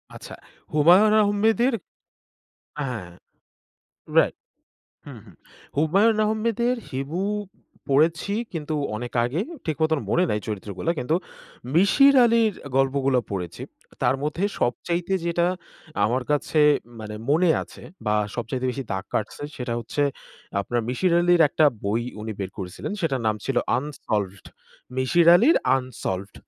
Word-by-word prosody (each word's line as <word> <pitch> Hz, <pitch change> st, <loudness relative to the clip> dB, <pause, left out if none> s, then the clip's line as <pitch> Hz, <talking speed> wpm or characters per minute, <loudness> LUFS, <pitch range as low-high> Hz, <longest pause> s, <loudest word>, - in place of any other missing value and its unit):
আচ্ছা -, -, -9 dB, 0.4 s
হুমায়ুন 180 Hz, +8 st, +6 dB
আহমেদের 220 Hz, +5 st, +2 dB, 1.1 s
হ্যাঁ। 110 Hz, -10 st, -5 dB, 1.1 s
রাইট -, -, +4 dB, 0.7 s
হুম, -, -, -9 dB
হুম। -, -, -17 dB, 0.4 s
হুমায়ুন 195 Hz, +9 st, +3 dB
আহমেদের 230 Hz, +3 st, 0 dB, 0.2 s
হিমু 140 Hz, +7 st, -3 dB, 0.7 s
পড়েছি 160 Hz, +8 st, +2 dB, 0.2 s
কিন্তু 155 Hz, -2 st, -4 dB, 0.2 s
অনেক 120 Hz, +2 st, -6 dB
আগে 130 Hz, +8 st, -1 dB, 0.3 s
ঠিক 155 Hz, -3 st, -1 dB
মতন 160 Hz, -1 st, +2 dB
মনে 180 Hz, -, +3 dB
নাই 105 Hz, -, 0 dB
চরিত্রগুলা 105 Hz, -, -3 dB
কিন্তু 140 Hz, +7 st, +1 dB, 0.6 s
মিশির 275 Hz, -, +5 dB
আলির 230 Hz, -2 st, +3 dB, 0.2 s
গল্পগুলো 135 Hz, -1 st, +2 dB
পড়েছি। 90 Hz, -4 st, -5 dB, 0.4 s
তার -, -, +3 dB
মধ্যে 155 Hz, +6 st, -1 dB, 0.2 s
সবচাইতে 170 Hz, -, -1 dB
যেটা 170 Hz, 0 st, +1 dB, 0.6 s
আমার 125 Hz, +4 st, +1 dB
কাছে 150 Hz, +1 st, +1 dB, 0.4 s
মানে 105 Hz, 0 st, -7 dB, 0.2 s
মনে 165 Hz, +3 st, +4 dB
আছে -, -, -13 dB, 0.2 s
বা 105 Hz, -, +2 dB, 0.2 s
সবচাইতে 125 Hz, +2 st, -3 dB
বেশি 135 Hz, +2 st, -4 dB
দাগ 95 Hz, 0 st, -3 dB
কাটছে 110 Hz, +6 st, -3 dB
সেটা 125 Hz, -2 st, -4 dB
হচ্ছে 120 Hz, +5 st, -2 dB, 0.6 s
আপনার 120 Hz, +5 st, -1 dB
মিশির 170 Hz, +8 st, +1 dB
আলির 175 Hz, 0 st, +4 dB
একটা 155 Hz, -, +2 dB, 0.2 s
বই 110 Hz, +4 st, 0 dB, 0.2 s
উনি 110 Hz, +1 st, -4 dB
বের 95 Hz, -1 st, -4 dB
করেছিলেন। 90 Hz, -, -5 dB
সেটার 140 Hz, -7 st, 0 dB
নাম 110 Hz, 0 st, +1 dB
ছিল 135 Hz, -2 st, -2 dB, 0.2 s
আনসলভড 105 Hz, -, -3 dB, 0.5 s
মিশির 165 Hz, +7 st, +3 dB
আলির 240 Hz, -, +5 dB, 0.2 s
আনসলভড। 105 Hz, -7 st, -5 dB
145 Hz, 125 wpm, -24 LUFS, 120-175 Hz, 1.1 s, হুমায়ুন